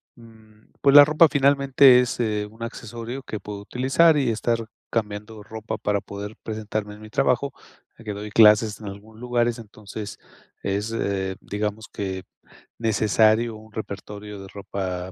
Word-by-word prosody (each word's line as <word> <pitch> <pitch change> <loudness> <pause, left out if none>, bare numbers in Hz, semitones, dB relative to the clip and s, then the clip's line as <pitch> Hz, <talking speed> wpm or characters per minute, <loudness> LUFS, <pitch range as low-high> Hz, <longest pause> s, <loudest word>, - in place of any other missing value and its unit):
mm, 110 -2 -19
pues, 140 -1 +5
la 145 0 +12
ropa 155 +2 +5
finalmente 140 -2 +5
es, 125 -1 -3
eh, 105 -3 0
un 115 +1 -9
accesorio 115 +3 -6
que 110 - -6
puedo 105 0 -7
utilizar 135 +9 +3
y 135 -4 +1
estar 115 +1 -1 0.2
cambiando 105 -1 -4
ropa 110 +1 -6
para 105 -1 -1
poder 100 +2 -7
presentarme 110 -1 -4
en 105 - -15
mi 110 - -11
trabajo, 125 +5 +1 0.4
ya - - -14
que 110 - -4
doy 105 +1 -6
clases 105 -1 +5
en 105 - -7
algunos 105 +3 -10
lugares, 120 -1 0
entonces 105 -1 -9 0.4
es, 100 +3 -2
eh, 95 -4 -2
digamos 105 +2 -4
que 95 -2 -4 0.5
necesario 110 +1 +2
un 110 +1 -14
repertorio 105 -1 -7
de 95 - -10
ropa, 95 -2 -5
110 Hz, 155 wpm, -24 LUFS, 105-120 Hz, 0.5 s, la